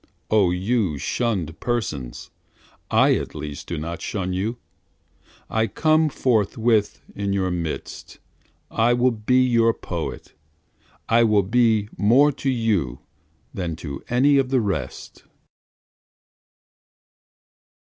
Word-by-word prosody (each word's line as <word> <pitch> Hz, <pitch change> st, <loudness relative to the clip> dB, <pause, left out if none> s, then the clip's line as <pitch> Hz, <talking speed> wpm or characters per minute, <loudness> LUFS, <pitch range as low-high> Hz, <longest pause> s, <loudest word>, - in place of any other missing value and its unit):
O 105 Hz, -4 st, +4 dB
you 95 Hz, -2 st, 0 dB
shunn'd 90 Hz, -, -2 dB
persons, 80 Hz, -, -3 dB, 0.6 s
I -, -, +4 dB
at -, -, -6 dB
least 75 Hz, -1 st, -7 dB
do 85 Hz, -, -4 dB
not 85 Hz, +2 st, -5 dB
shun 95 Hz, -3 st, -3 dB
you, 105 Hz, +6 st, -2 dB, 0.9 s
I 110 Hz, 0 st, 0 dB
come 155 Hz, +2 st, +2 dB
forthwith 110 Hz, -3 st, +1 dB
in 100 Hz, -1 st, -2 dB
your 95 Hz, -2 st, 0 dB
midst, 85 Hz, -3 st, -5 dB, 0.5 s
I 115 Hz, +2 st, +3 dB
will 125 Hz, +1 st, +3 dB
be 125 Hz, +3 st, +2 dB
your 115 Hz, -2 st, +3 dB
poet, -, -, -6 dB, 0.7 s
I 115 Hz, +1 st, +4 dB
will 105 Hz, -3 st, +3 dB
be 110 Hz, 0 st, +2 dB
more 130 Hz, +8 st, +5 dB
to 140 Hz, 0 st, -3 dB
you 110 Hz, -, 0 dB, 0.5 s
than 85 Hz, -4 st, -3 dB
to 70 Hz, -4 st, -7 dB
any 140 Hz, +4 st, +4 dB
of 130 Hz, -1 st, 0 dB
the 130 Hz, -1 st, +2 dB
rest. 100 Hz, -4 st, -4 dB
110 Hz, 115 wpm, -23 LUFS, 90-120 Hz, 0.9 s, more